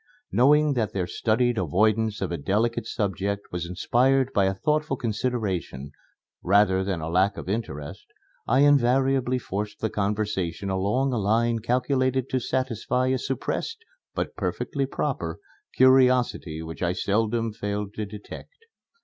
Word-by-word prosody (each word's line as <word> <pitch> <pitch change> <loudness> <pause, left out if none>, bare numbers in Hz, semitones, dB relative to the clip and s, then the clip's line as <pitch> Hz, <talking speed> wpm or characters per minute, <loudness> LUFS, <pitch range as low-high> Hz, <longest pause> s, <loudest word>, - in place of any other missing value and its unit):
Knowing 150 +4 +4
that 115 -5 -1
their 95 -2 -1
studied 115 +6 +1
avoidance 110 +5 +1
of 95 - -2
a 85 - -2
delicate 115 +8 0
subject 100 -1 -2
was 85 -1 -3
inspired 130 +8 +2
by 100 -2 +3
a 95 - +1
thoughtful 150 +5 0
consideration, 105 - -2 0.5
rather 95 0 +3
than 95 -4 -2
a 80 - -4
lack 95 +4 +2
of - - -7
interest, 95 -9 -5 0.4
I 130 +4 +3
invariably 135 -2 +3
forced 105 -3 -4
the 110 - -2
conversation 100 -3 -2
along 105 +8 0
a 120 - 0
line 115 +3 +1
calculated 130 +2 0
to 130 - +1
satisfy 130 0 -1
a 130 0 +1
suppressed, 450 - -3 0.3
but - - -3
perfectly 140 -2 -2
proper, 105 - -3 0.4
curiosity 125 -11 +3
which 80 0 -8
I 90 0 +1
seldom 110 +3 0
failed 105 -1 -4
to 110 - -4
detect. 105 - -11
110 Hz, 140 wpm, -25 LUFS, 95-130 Hz, 0.5 s, Knowing